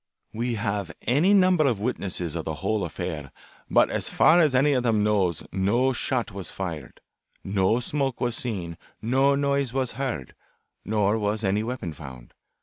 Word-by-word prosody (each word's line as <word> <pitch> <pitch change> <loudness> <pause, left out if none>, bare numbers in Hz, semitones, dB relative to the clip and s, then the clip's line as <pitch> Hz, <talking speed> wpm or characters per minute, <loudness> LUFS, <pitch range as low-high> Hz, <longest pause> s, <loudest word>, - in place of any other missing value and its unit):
We 120 +2 -2
have 100 -3 -2
any 150 +11 +3
number 185 -6 +4
of 115 -6 0
witnesses 95 -7 -3
of 80 - -3
the 80 - -3
whole 110 -2 +1
affair, 75 -3 -5 0.4
but - - +4
as - - +1
far 170 +2 +5
as 150 -6 +3
any 145 +3 +4
of 130 - +2
them 115 -4 +2
knows 100 -6 +1
no 115 +8 +1
shot 120 -2 -1
was 95 -2 -5
fired, 80 -8 -6 0.4
no 95 +3 +1
smoke 135 0 -2
was 120 -1 0
seen, 90 -9 -4 0.2
no 135 +4 +2
noise 140 -2 0
was 130 -2 -1
heard, 120 - -4 0.5
nor 105 0 +1
was 105 +1 -1
any 100 +1 +1
weapon 110 -8 -4
found. 65 -5 -11
110 Hz, 165 wpm, -25 LUFS, 95-130 Hz, 0.5 s, far